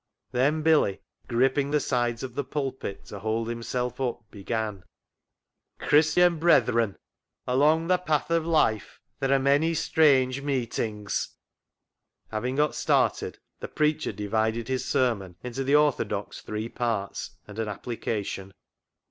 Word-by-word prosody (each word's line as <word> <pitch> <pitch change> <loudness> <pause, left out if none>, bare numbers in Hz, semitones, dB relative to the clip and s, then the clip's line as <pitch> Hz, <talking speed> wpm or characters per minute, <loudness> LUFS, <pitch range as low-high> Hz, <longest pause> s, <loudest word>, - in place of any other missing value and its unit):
Then 145 +5 +1
Billy, 150 -11 +3 0.3
gripping 135 +4 +2
the 150 +1 +2
sides 120 -3 -1
of 130 -2 -5
the 145 - -2
pulpit 135 -8 -4
to 100 - -8
hold 110 +2 -1
himself 120 +2 -3
up, 120 -2 -2
began 105 -1 -3 0.3
— - - -60
" - - -52
Christian 160 +3 +4
brethren, 115 - +3 0.5
along 150 +6 +3
the 180 +1 +2
path 155 -3 -1
of 165 -1 +2
life 155 -11 +1 0.2
there 135 0 0
are 135 - +5
many 145 +5 +2
strange 140 -5 +3
meetings... 115 -7 -2 0.4
." - - -46
Having 120 +4 -2
got 150 +1 +2
started, - - +1 0.2
the - - -5
preacher 150 0 0
divided 110 +3 -1
his 130 -1 -1
sermon 100 -8 0
into 125 +2 -3
the 140 +2 +3
orthodox 120 -9 +1
three 105 +1 -4
parts 115 -5 -3
and 105 +1 -9
an 110 - -1
application. 100 -3 -4
125 Hz, 140 wpm, -26 LUFS, 110-150 Hz, 0.5 s, are